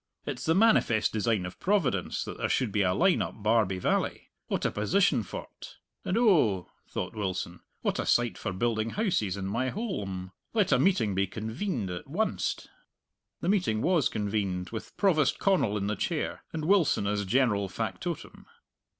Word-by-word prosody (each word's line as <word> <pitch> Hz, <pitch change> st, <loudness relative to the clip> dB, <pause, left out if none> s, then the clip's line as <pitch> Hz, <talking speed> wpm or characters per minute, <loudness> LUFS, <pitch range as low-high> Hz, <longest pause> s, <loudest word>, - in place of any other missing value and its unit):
It's -, -, -4 dB
the 160 Hz, -, +3 dB
manifest 195 Hz, -, +4 dB
design 110 Hz, -3 st, +1 dB
of 90 Hz, -, -8 dB
Providence 190 Hz, -, 0 dB
that -, -, -7 dB
there -, -, -1 dB
should 125 Hz, -5 st, +1 dB
be 105 Hz, -, +1 dB
a 95 Hz, -2 st, +3 dB
line 180 Hz, -, +3 dB
up 105 Hz, -, -5 dB
Barbie 105 Hz, -4 st, +2 dB
Valley! 90 Hz, -, -1 dB, 0.2 s
What -, -, -1 dB
a -, -, +2 dB
position 140 Hz, -, +2 dB
for't! 100 Hz, -, -9 dB, 0.3 s
And, 185 Hz, -, 0 dB
oh," 150 Hz, -, +3 dB, 0.2 s
thought -, -, -4 dB
Wilson, 95 Hz, -4 st, -3 dB, 0.2 s
"what -, -, 0 dB
a -, -, -2 dB
site 120 Hz, -1 st, +2 dB
for 100 Hz, -, -4 dB
building 110 Hz, +3 st, 0 dB
houses 170 Hz, -, 0 dB
in 95 Hz, -, -4 dB
my 115 Hz, +7 st, -1 dB
holm! 100 Hz, -, -4 dB, 0.2 s
Let 205 Hz, -4 st, +3 dB
a -, -, +5 dB
meeting 180 Hz, -, +2 dB
be 95 Hz, +1 st, +1 dB
convened 110 Hz, -, -3 dB
at 90 Hz, +6 st, -6 dB
wunst!" 210 Hz, +9 st, -1 dB, 0.7 s
The 170 Hz, -, 0 dB
meeting 175 Hz, -, +1 dB
was 175 Hz, -5 st, +3 dB
convened, 100 Hz, -3 st, -2 dB
with 110 Hz, -, -7 dB
Provost 160 Hz, -9 st, +3 dB
Connal 185 Hz, -, +2 dB
in 100 Hz, -, -2 dB
the 105 Hz, +1 st, -1 dB
chair -, -, -2 dB
and 155 Hz, -1 st, -3 dB
Wilson 175 Hz, -, +3 dB
as 100 Hz, 0 st, 0 dB
general 105 Hz, -2 st, +2 dB
factotum. 140 Hz, -, -5 dB
110 Hz, 170 wpm, -29 LUFS, -, 0.7 s, a